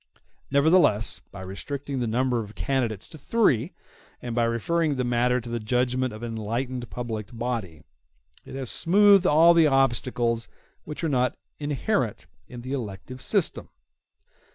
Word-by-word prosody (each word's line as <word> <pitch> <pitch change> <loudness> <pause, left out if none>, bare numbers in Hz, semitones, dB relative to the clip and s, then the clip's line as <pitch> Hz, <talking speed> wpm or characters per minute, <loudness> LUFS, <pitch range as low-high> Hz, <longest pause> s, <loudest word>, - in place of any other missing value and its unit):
Nevertheless, 140 - +3
by 100 - -9
restricting 135 +9 -5
the 120 - -1
number 125 +2 +1
of 105 -1 -7
candidates 120 -7 -1
to 155 - -12
three, 150 - +1 0.5
and 120 -1 -5
by 120 0 +2
referring 145 +7 0
the 130 - -1
matter 125 +1 +1
to 120 - -10
the 120 0 -3
judgment 125 +3 0
of 110 +2 -9
an 120 - -4
enlightened 120 +2 -3
public 110 +1 -5
body, 115 -10 -4 0.6
it - - -10
has 135 -3 -4
smoothed 200 +1 +5
all 165 +3 +6
the 165 -2 +5
obstacles 120 -3 +1
*y - - -32 0.3
which 150 +2 -7
are 165 - +1
not 125 -3 +1 0.2
inherent 145 - -1 0.2
in 120 -1 -9
the 130 +3 -5
elective 125 +1 -6
system. - - -1
125 Hz, 155 wpm, -25 LUFS, 115-140 Hz, 0.6 s, all